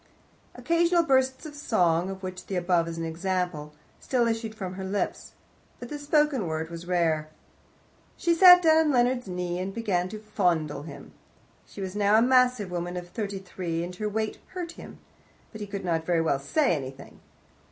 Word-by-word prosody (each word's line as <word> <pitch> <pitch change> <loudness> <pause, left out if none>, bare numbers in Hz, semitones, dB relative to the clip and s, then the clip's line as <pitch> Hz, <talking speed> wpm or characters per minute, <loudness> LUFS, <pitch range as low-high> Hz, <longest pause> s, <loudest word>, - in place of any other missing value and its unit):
Occasional 340 0 +2
bursts 265 -1 +1
of 305 - -8
song 180 - +1
(of 190 0 -7
which 185 0 -7
the 195 - -3
above 175 -2 +1
is 165 0 -5
an 165 - -3
example) 170 -2 -2 0.3
still 250 -3 +1
issued 225 -1 -2
from 190 -4 -5
her 190 +1 -6
lips, 195 +2 -3 0.5
but 240 - -8
the 295 - -5
spoken 290 - +1
word 160 +1 -3
was 170 +1 -8
rare. 160 -4 +1 0.9
She 340 - +2
sat 360 +1 +9
down 320 -1 +6
on - - +2
Leonard's 245 -2 +1
knee, 180 -1 -3
and 190 +1 -3
began 190 -5 -1
to 215 - -6
fondle 175 -9 -1
him. 145 -2 -10 0.6
She - - -10
was 190 0 -5
now 205 0 +3
a - - +5
massive 250 -6 +3
woman 175 0 -3
of 175 0 -7
thirty 200 -2 -4
three, 180 -3 -4
and 180 +1 -6
her 210 +1 -2
weight 220 +1 -3
hurt 355 -3 -6
him, - - -12 0.5
but 215 - -9
he 205 - -5
could 200 -1 -5
not 165 -2 0
very 170 -2 +2
well 140 -4 +1
say 260 - +1
anything. 135 -1 -8
190 Hz, 185 wpm, -27 LUFS, 175-245 Hz, 0.9 s, sat